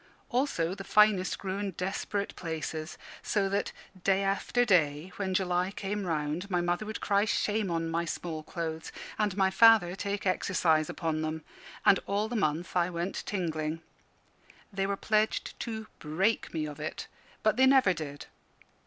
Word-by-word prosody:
Also 245 - 0
the 195 0 -7
finest 210 -2 +4
grew 195 0 -4
in 205 -1 -2
desperate 195 +3 -3
places. 160 -1 -4 0.2
So 200 -2 +1
that, 200 +1 -1 0.3
day 195 0 +3
after 200 +5 +1
day, 165 -4 +2
when 190 -2 -1
July 180 -1 +1
came 200 0 -3
round, 155 +4 -2
my 180 -2 +1
mother 175 +4 -1
would 215 - -5
cry 200 0 +3
shame 215 -2 0
on 165 -1 -1
my 165 +1 -1
small 160 -1 -4
clothes, 160 -1 -5 0.3
and 205 -3 0
my 190 -1 +3
father 205 -3 +6
take 200 +1 -3
exercise 170 -4 +2
upon 160 -2 -2
them; 155 0 -3 0.4
and 195 - +6
all 205 +2 0
the 240 - -4
month 165 -4 -1
I 175 0 +3
went 175 +2 -3
tingling. 165 -4 -2 0.9
They 195 0 0
were 200 0 -1
pledged 215 +1 0
to 220 -1 -4
"break 185 +9 0
me 155 -2 -2
of 150 -1 -7
it"; 155 - -4 0.4
but 215 - +3
they 260 +1 +6
never 260 -8 +5
did. 145 -3 -6
185 Hz, 160 wpm, -30 LUFS, 165-205 Hz, 0.9 s, father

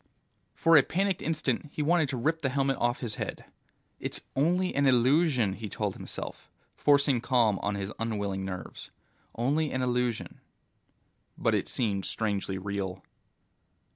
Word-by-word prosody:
For 165 0 +4
a - - +9
panicked 190 +6 -1
instant 150 -3 -1
he 150 - -2
wanted 155 -1 +3
to 130 - -2
rip 160 +7 0
the 135 - +1
helmet 135 0 +1
off 120 +2 0
his 110 -4 -4
head. - - -5 0.5
It's - - -3
only 180 +6 +2
an 140 0 +2
illusion, 130 - +3
he 105 +1 -6
told - - -2
himself, - - -8 0.3
forcing 140 -4 +3
calm 115 -6 +2
on 100 0 -1
his 100 +1 -4
unwilling 100 -4 -2
nerves. 90 -3 -7 0.5
Only 145 +6 +1
an 130 0 -1
illusion. 125 -2 -1 1.0
But - - +1
it - - 0
seemed 100 -5 0
strangely 100 -3 -1
real. 95 -1 -4
125 Hz, 145 wpm, -29 LUFS, 105-145 Hz, 1.0 s, a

